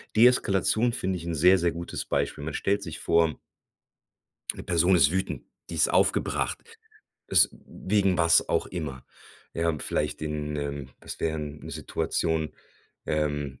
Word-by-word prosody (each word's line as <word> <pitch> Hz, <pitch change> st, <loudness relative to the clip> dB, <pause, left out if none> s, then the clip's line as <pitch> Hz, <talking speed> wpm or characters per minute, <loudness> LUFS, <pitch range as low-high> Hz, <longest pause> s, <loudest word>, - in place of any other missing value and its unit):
Deeskalation 115 Hz, 0 st, +4 dB
finde 95 Hz, -5 st, -2 dB
ich 85 Hz, -, -8 dB
'n 85 Hz, -, -2 dB
sehr, 90 Hz, +5 st, +6 dB
sehr 85 Hz, -1 st, +1 dB
gutes 85 Hz, +1 st, -5 dB
Beispiel. 70 Hz, -, -1 dB
Man 75 Hz, 0 st, -4 dB
stellt 100 Hz, +5 st, 0 dB
sich 80 Hz, -, -7 dB
vor 85 Hz, -2 st, +2 dB, 1.1 s
'ne -, -, -9 dB
Person 90 Hz, +1 st, +3 dB
ist 80 Hz, -3 st, +5 dB
wütend, 95 Hz, +1 st, -2 dB, 0.3 s
die -, -, -5 dB
ist -, -, +3 dB
aufgebracht, -, -, +1 dB, 0.7 s
es -, -, +5 dB, 0.2 s
wegen 95 Hz, -2 st, 0 dB
was 85 Hz, 0 st, +4 dB
auch -, -, +1 dB
immer. 75 Hz, -8 st, -6 dB, 0.5 s
Ja, 85 Hz, -1 st, +1 dB
vielleicht -, -, -2 dB
den, 75 Hz, -1 st, -3 dB
ähm 70 Hz, -2 st, -4 dB
was -, -, -8 dB
wären 75 Hz, -2 st, -3 dB
Situationen, 80 Hz, -1 st, -1 dB, 0.5 s
ähm 75 Hz, -3 st, -2 dB
85 Hz, 140 wpm, -27 LUFS, 75-95 Hz, 1.1 s, sehr